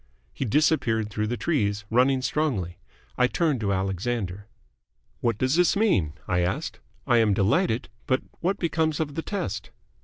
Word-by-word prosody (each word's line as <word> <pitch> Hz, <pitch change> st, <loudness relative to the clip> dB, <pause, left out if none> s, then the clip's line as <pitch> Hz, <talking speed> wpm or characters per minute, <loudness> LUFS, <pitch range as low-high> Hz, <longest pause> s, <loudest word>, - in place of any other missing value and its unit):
He -, -, -3 dB
disappeared 115 Hz, -5 st, +2 dB
through 105 Hz, +1 st, -1 dB
the 120 Hz, +2 st, -2 dB
trees, 105 Hz, -10 st, 0 dB
running 130 Hz, +2 st, +3 dB
strongly. 110 Hz, -, -1 dB, 0.4 s
I 125 Hz, -, +5 dB
turned 150 Hz, -1 st, +1 dB
to 100 Hz, -2 st, 0 dB
Alexander. 95 Hz, +1 st, -2 dB, 0.7 s
"What 115 Hz, -3 st, 0 dB
does 130 Hz, +6 st, +1 dB
this 180 Hz, -1 st, +4 dB
mean?" 185 Hz, -, +2 dB
I 90 Hz, -, +1 dB
asked. 90 Hz, +1 st, -2 dB, 0.3 s
"I 120 Hz, -, +4 dB
am 105 Hz, -3 st, +3 dB
delighted, 110 Hz, -, +1 dB, 0.2 s
but 130 Hz, 0 st, +1 dB, 0.2 s
what 190 Hz, +3 st, 0 dB
becomes 160 Hz, -3 st, 0 dB
of 150 Hz, -3 st, -2 dB
the 165 Hz, -, -2 dB
test?" 195 Hz, -, -4 dB
120 Hz, 155 wpm, -26 LUFS, 100-155 Hz, 0.7 s, I